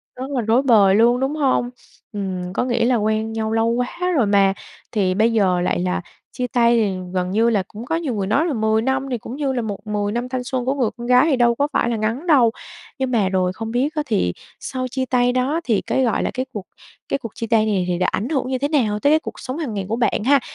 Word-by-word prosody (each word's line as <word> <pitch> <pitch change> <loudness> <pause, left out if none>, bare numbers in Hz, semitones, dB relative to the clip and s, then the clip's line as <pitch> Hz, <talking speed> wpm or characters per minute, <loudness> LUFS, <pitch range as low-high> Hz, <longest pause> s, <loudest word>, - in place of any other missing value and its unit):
Rất 260 +3 -6
là 255 -3 0
rối 225 +4 +2
bời 210 -7 +5
luôn 235 +3 +4
đúng 270 +3 -1
hông? 265 -4 +1 0.4
Ừm, 185 -3 -4
có - - 0
nghĩa 240 -2 +1
là 250 - +3
quen 220 0 0
nhau 220 -1 -2
lâu 225 0 +2
quá 250 +10 -1
rồi 255 -7 +3
mà 200 -1 +3 0.4
thì 195 -4 +1
bây 220 +4 +2
giờ 185 -5 +2
lại 175 - 0
là 180 0 -1 0.3
chia 250 0 -3
tay 235 -1 +3
thì 205 -4 +1 0.2
gần 180 0 -1
như 225 +3 +3
là 205 -4 +1
cũng 220 +3 -9
có 325 - -1
nhiều 325 -6 -2
người 195 -2 -2
nói 280 +10 +2
là 325 - -1
10 220 -1 +1
năm 265 +2 -1
thì 245 - 0
cũng 235 +3 -8
như 280 -2 -1
là 245 - -1
một 210 -1 -6
10 205 -1 -1
năm 240 +2 -3
thanh 255 -1 -3
xuân 255 -1 -3
của 265 - +1
người 250 -6 +1
con 240 - -6
gái 250 +4 +5
thì 275 - +3
đâu 240 -1 +3
có 285 +3 +1
phải 235 - +1
là 235 - 0
ngắn 225 +9 -2
đâu. 260 -8 +5 0.5
Nhưng 260 -1 -1
mà 205 -5 +2
rồi 185 -1 0
không 225 +2 -6
biết 270 +7 0
á 300 - 0
thì 200 - 0 0.3
sau 255 -1 -4
chia 260 -1 -1
tay 245 -1 +2
đó 265 +6 0
thì 225 -8 +1
cái 265 - 0
gọi 235 - +1
là - - -1
cái 255 0 -2
cuộc 205 -3 -6 0.4
cái 275 - 0
cuộc 230 -5 -7
chia 230 - -4
tay 220 -1 +3
này 195 -4 0
thì 175 -1 0
đã 180 - +1
ảnh 230 +8 -2
hưởng 265 -5 -1
như 260 - -1
thế 280 +3 -1
nào 225 -9 +1
tới 285 - +3
cái 315 - +5
cuộc - - -8
sống 255 +2 -5
hàng 290 -10 -4
ngày 195 -2 -3
của 225 - 0
bạn 235 -3 0
ha? 280 +2 +5
235 Hz, 275 wpm, -21 LUFS, 210-260 Hz, 0.5 s, bời